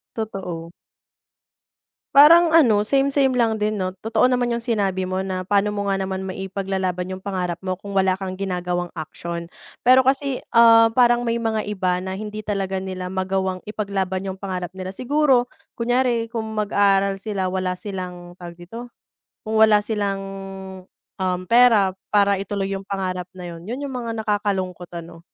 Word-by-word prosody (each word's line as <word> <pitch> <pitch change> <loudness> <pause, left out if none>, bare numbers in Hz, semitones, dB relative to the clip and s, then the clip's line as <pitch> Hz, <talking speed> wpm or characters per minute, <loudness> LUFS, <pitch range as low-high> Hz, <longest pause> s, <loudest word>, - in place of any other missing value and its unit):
Totoo. 185 -7 -5 1.4
Parang 330 +3 +8
ano 215 -9 +5
same-same 275 -1 +3
lang 225 -3 +1
din 215 +1 0
'no, 185 -2 -2
totoo 225 +3 +2
naman 245 -1 +1
yung 235 - -3
sinabi 195 -5 0
mo 185 +1 -2
na 185 -1 -3
paano 205 +2 +1
mo 200 -1 -1
nga 195 - 0
naman 190 0 -3
maipaglalaban 190 -1 -3
yung 185 - -5
pangarap 180 -3 -3
mo 185 -1 -3
kung 200 +2 -10
wala 190 -1 +2
kang 190 -1 -6
ginagawang 180 -2 -2
action. 170 +2 -6 0.3
Pero 255 +1 +6
kasi, 270 -1 +1 0.2
ah, 230 -1 +8
parang 240 -1 +4
may 230 - +1
mga 220 -2 -1
iba 185 -3 0
na 190 +1 -5
hindi 215 +1 -6
talaga 195 -2 -1
nila 185 -1 -5
magawang 190 0 -1
ipaglaban 195 -3 -2
yung 190 -1 -5
pangarap 185 -3 -4
nila. 190 0 -7
Siguro 260 -2 +2 0.2
kunyari 240 -1 0
kung 225 -2 -3
mag-aaral 200 -2 +2
sila 195 -3 -2
wala 185 -1 -1
silang 180 -2 -7
tawag 175 -1 -9
dito? 225 +8 -9 0.6
Kung 220 0 0
wala 210 -1 +6
silang 200 -3 -1 1.2
pera, 230 -5 +5
um, - - -23 0.2
para 200 -1 +4
ituloy 195 0 -3
yung 195 0 -5
pangarap 185 -2 -3
na 175 -2 -7
'yon, 165 - -9
'yon 265 +4 -4
yung 275 - -5
mga 230 -2 -4
nakakalungkot 190 -4 -2
ano? 165 0 -9
195 Hz, 160 wpm, -22 LUFS, 185-225 Hz, 1.4 s, Parang